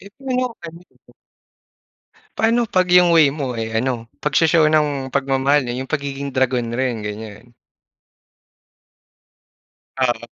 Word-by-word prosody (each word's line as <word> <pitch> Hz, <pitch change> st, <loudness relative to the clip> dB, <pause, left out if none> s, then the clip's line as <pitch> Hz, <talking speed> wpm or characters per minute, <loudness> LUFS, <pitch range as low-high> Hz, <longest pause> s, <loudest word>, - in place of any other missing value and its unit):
Eh, 200 Hz, -, -13 dB
pero, 255 Hz, -3 st, -3 dB
ano 165 Hz, +1 st, -9 dB
ito? -, -, -26 dB, 1.3 s
Paano 230 Hz, +2 st, +2 dB
pag 185 Hz, -1 st, +2 dB
yung 180 Hz, -1 st, +6 dB
way 150 Hz, -4 st, +4 dB
mo, 130 Hz, -6 st, -4 dB
eh, 110 Hz, 0 st, -4 dB
ano, 125 Hz, -3 st, -3 dB, 0.2 s
pag-sho-show 155 Hz, +1 st, +3 dB
ng 145 Hz, -4 st, 0 dB
pagmamahal, 135 Hz, 0 st, +1 dB
eh, 120 Hz, -, -3 dB
yung 135 Hz, -, -12 dB
pagiging 140 Hz, -1 st, -3 dB
dragon 125 Hz, -3 st, 0 dB
rin, 120 Hz, -2 st, -2 dB
ganyan. 105 Hz, +2 st, -8 dB, 2.5 s
Oo. 120 Hz, -3 st, +1 dB
140 Hz, 120 wpm, -20 LUFS, 125-160 Hz, 2.5 s, yung